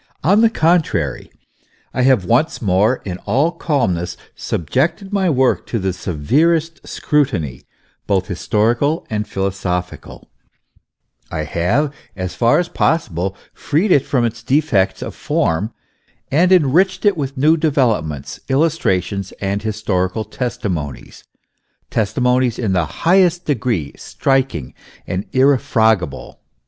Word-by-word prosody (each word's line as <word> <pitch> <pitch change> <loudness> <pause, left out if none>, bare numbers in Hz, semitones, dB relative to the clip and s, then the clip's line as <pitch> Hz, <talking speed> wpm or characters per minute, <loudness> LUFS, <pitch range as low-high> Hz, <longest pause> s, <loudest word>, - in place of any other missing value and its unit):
On 200 +8 +4
the 230 - +5
contrary, 170 -5 0 0.6
I 130 - 0
have 125 -7 +3
once 130 - +1
more, 105 +4 +1
in 90 -2 -5
all 145 +7 +2
calmness, 90 - -1 0.2
subjected 155 - -2
my 190 -3 +2
work 130 -4 +1
to 115 - -2
the 95 -3 -1
severest 150 - 0
scrutiny, 110 - -1 0.4
both 95 -2 +1
historical 115 - 0
and 105 -1 -2
philosophical; 95 -3 -4 1.0
I - - -3
have, 120 - 0 0.2
as 95 -2 -4
far 115 +5 +3
as 175 - 0
possible, 95 - -1 0.2
freed 175 +7 0
it 140 - +5
from 125 -4 0
its 115 0 -3
defects 120 -6 +1
of - - -6
form, 95 +8 -1 0.6
and 170 +6 +3
enriched 185 +4 +3
it 205 -2 +4
with 140 -3 -4
new 155 +5 +4
developments, 115 - 0
illustra 140 - +2
tions 100 -1 -6
and 100 +1 -3
historical 105 -2 -1
testimonies, 100 - -5 0.7
testimonies 125 +3 +1
in 110 -6 -1
the 90 -3 +1 0.2
highest 180 0 +4
degree 115 - -1
striking 130 - -1 0.3
and 95 +2 -3
irrefragable. 110 - +1
120 Hz, 120 wpm, -18 LUFS, 95-150 Hz, 1.0 s, the